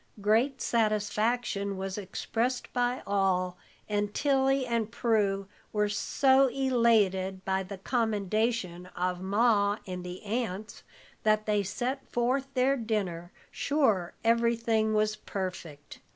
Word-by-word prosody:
Great 230 +6 +2
satisfaction 215 -2 0
was 190 0 -4
expressed 225 +5 -3
by 245 0 0
all, 185 -2 +1 0.3
and 205 -1 -1
Tilly 270 -1 +2
and 230 -3 -1
Prue 210 -5 +1 0.2
were 210 -1 +1
so 265 +5 +3
elated 220 -8 +2
by 190 0 +1
the 195 +1 -7
commendation 215 -4 -1
of 180 0 -1
Ma 205 +1 +2
and 180 -1 -5
the 180 0 -7
aunts, 215 -2 -3 0.4
that 215 0 +2
they 210 -1 +2
set 245 +7 -3
forth 260 +3 0
their 260 +2 +3
dinner, 195 -7 -2 0.2
sure 220 - +1
everything 230 -1 +2
was 215 0 +2
perfect. 180 -8 -6
215 Hz, 115 wpm, -29 LUFS, 195-240 Hz, 0.4 s, so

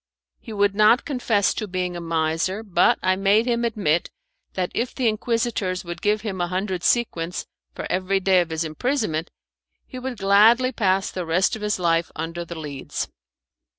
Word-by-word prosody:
He 225 - -11
would 205 -1 +2
not 215 +5 +4
confess 235 -8 +1
to 215 - -4
being 180 -1 -3
a 175 - -5
miser, 165 +5 -1
but 180 -5 +3
I 185 0 +3
made 200 +4 +3
him 240 -1 0
admit 200 -8 0 0.4
that 180 -1 -2
if 240 +1 -2
the 255 -3 +1
Inquisitors 215 -4 -1
would 175 0 -6
give 210 +1 +1
him 195 -5 -4
a 175 - 0
hundred 185 0 -3
sequins 180 -8 0 0.3
for - - -5
every 190 +1 0
day 190 -1 +4
of 170 - -3
his 160 0 -2
imprisonment 165 - -2 0.6
he 255 - -8
would 255 -1 -5
gladly 215 +6 +5
pass 195 -5 +1
the 185 - -4
rest 180 +7 +1
of 220 - -9
his 210 0 0
life 170 -2 +1
under 165 +2 -4
the 170 0 -8
Leads. 145 -3 -5
195 Hz, 180 wpm, -23 LUFS, 175-220 Hz, 0.6 s, gladly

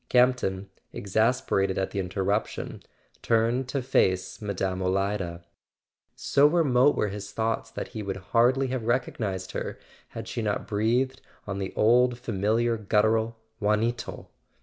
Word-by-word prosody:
Campton, 125 -7 +2 0.2
exasperated 100 -2 +1
at 95 -1 -1
the 100 - -3
interruption, 95 +3 -2 0.4
turned 120 +3 +1
to 135 -1 -2
face 95 -8 +1
Mme. 95 -2 -2
Olida. 95 -2 -1 0.7
So 140 +1 +4
remote 145 -4 +4
were 105 - 0
his 100 0 -7
thoughts 115 0 -1
that - - -6
he 110 - -6
would 100 -2 -4 0.2
hardly 125 +3 +4
have 125 -3 -3
recognized 105 -6 -1
her - - -4 0.3
had - - -8
she 115 - -3
not 105 -2 -1
breathed, 120 +5 0 0.2
on 100 -1 -4
the 95 -1 -3
old 120 +2 +4
familiar 115 +1 0
guttural: 110 +2 +1 0.2
"Juanito!" 110 +3 -1
110 Hz, 130 wpm, -27 LUFS, 100-125 Hz, 0.7 s, So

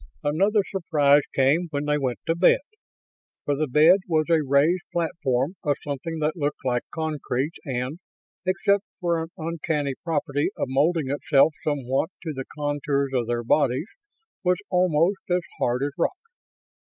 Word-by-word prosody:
Another 195 +8 +2
surprise 150 -6 +3
came 145 +6 +3
when 145 -1 -3
they 150 0 +1
went 130 -3 -1
to 165 - +2
bed. 175 +2 +4 0.8
For 145 - +1
the 155 +2 -1
bed 155 +8 +6
was 155 -3 +2
a 165 -2 +4
raised 145 +6 +3
platform 160 -2 -1
of 145 -2 +1
something 150 +3 -4
that 155 +1 0
looked 145 -4 -3
like 125 -2 +1
concrete 150 -2 -2
and, 130 +3 -3 0.4
except 195 +2 +1 0.2
for 170 -3 0
an 160 - -5
uncanny 160 -4 -2
property 150 -3 0
of - - -2
molding 145 +1 +1
itself 145 +1 +3
somewhat 140 +1 0
to 160 -3 -3
the 135 -1 -5
contours 145 -1 -1
of 120 -3 0
their 120 0 -1
bodies, 135 - +1 0.5
was 180 0 +3
almost 180 +1 +2
as 180 0 +1 0.2
hard 125 +2 +1
as 145 - -1
rock. 375 - +1
150 Hz, 155 wpm, -24 LUFS, 140-170 Hz, 0.8 s, bed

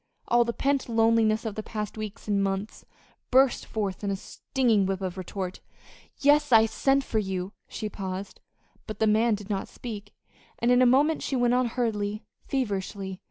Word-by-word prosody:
All 240 0 +4
the 235 - -2
pent 275 +1 0
loneliness 225 -1 +3
of 220 - -2
the 215 - -4
past 210 -1 -5
weeks 215 0 -7
and 200 -1 +2
months 195 +2 -3 0.4
burst 265 0 +3
forth 205 -3 -3
in 200 - -1
a 195 - 0
stinging 220 0 0
whip 190 -1 -1
of 185 -2 -4
retort. 185 0 -5 0.6
"Yes, 290 0 +4
I 225 -1 +7
sent 270 +5 +1
for 220 - -1
you." 190 -1 -3
She 215 - -5
paused, 195 -1 -6 0.5
but 215 - -5
the 220 - +2
man 220 +1 +3
did 205 0 -8
not 195 -1 -2
speak, 205 -4 -8 0.4
and 240 +1 +2
in 250 0 +5
a 255 - +6
moment 290 +6 +3
she 270 - -2
went 245 -1 +3
on 250 0 +3
hurriedly, 215 -3 -2 0.2
feverishly. 195 -6 -3
215 Hz, 180 wpm, -27 LUFS, 200-240 Hz, 0.6 s, I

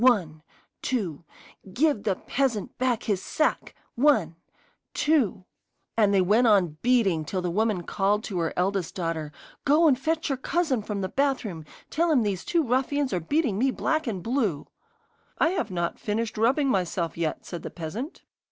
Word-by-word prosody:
One 180 -12 +3 0.4
two 180 - -2 0.5
Give 290 -3 +2
the 200 -3 0
peasant 245 -4 -1
back 250 -3 +1
his 200 -4 0
sack! 310 - -1 0.2
One 230 - +3 0.6
two 265 -12 +1 0.3
' - - -50
And 210 -3 +4
they 195 -2 +4
went 220 +6 +4
on 185 -8 +3
beating 225 -10 +3
till 180 +4 -3
the 175 - -1
woman 210 -1 0
called 205 +4 0
to 190 -6 -3
her 165 -1 0
eldest 185 -1 0
daughter: 165 -5 -3 0.3
'Go 305 +4 +5
and 260 -4 +3
fetch 315 +3 -1
your 270 -2 -1
cousin 310 -5 0
from 205 -1 -4
the 190 - -1
bathroom. 235 - -1 0.3
Tell 335 +3 +1
him 260 -6 +4
these 195 -4 -2
two 335 -2 +1
ruffians 265 +2 0
are 180 - +1
beating 230 - 0
me 265 +3 +3
black 315 +3 -1
and 190 -6 -3
blue.' 225 - 0 0.7
'I've 345 +3 +1
not 175 -2 -2
finished 220 +1 -2
rubbing 265 +6 +2
myself 180 -5 -1
yet,' 165 -2 -2
said 175 -3 -6
the - - -6
peasant. 200 - -6
215 Hz, 170 wpm, -26 LUFS, 180-270 Hz, 0.7 s, Go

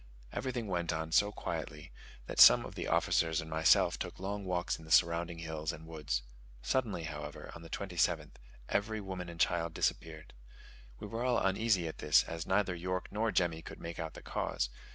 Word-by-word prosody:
Everything 125 -3 -3
went 85 -4 -1
on 80 0 -3
so 105 +5 +4
quietly 75 -6 -5 0.3
that - - -5
some - - +9
of - - -8
the - - -4
officers 80 0 +2
and 80 - -5
myself 80 +1 +4
took - - -5
long 100 +1 -4
walks 90 -3 -1
in - - -12
the 80 - -13
surrounding 85 +1 +3
hills 80 -2 -3
and 80 - -10
woods. 75 -7 -3 0.4
Suddenly, 115 -10 0
however, 75 -2 -7
on 85 - -10
the 80 - -11
27th, 85 -5 -1 0.4
every 110 +2 0
woman 95 -3 -6
and 85 -1 -10
child 85 0 +1
disappeared. 80 -1 -2 0.6
We - - -8
were 115 +3 -4
all 125 -2 +2
uneasy 95 -3 +2
at 80 - -7
this, - - +5
as 85 0 -6
neither 95 -1 +2
York 90 +1 -3
nor 110 +2 0
Jemmy 85 -4 +1
could - - -10
make 85 0 -7
out 80 -1 -5
the - - -10
cause. - - -2
85 Hz, 190 wpm, -33 LUFS, 80-95 Hz, 0.6 s, some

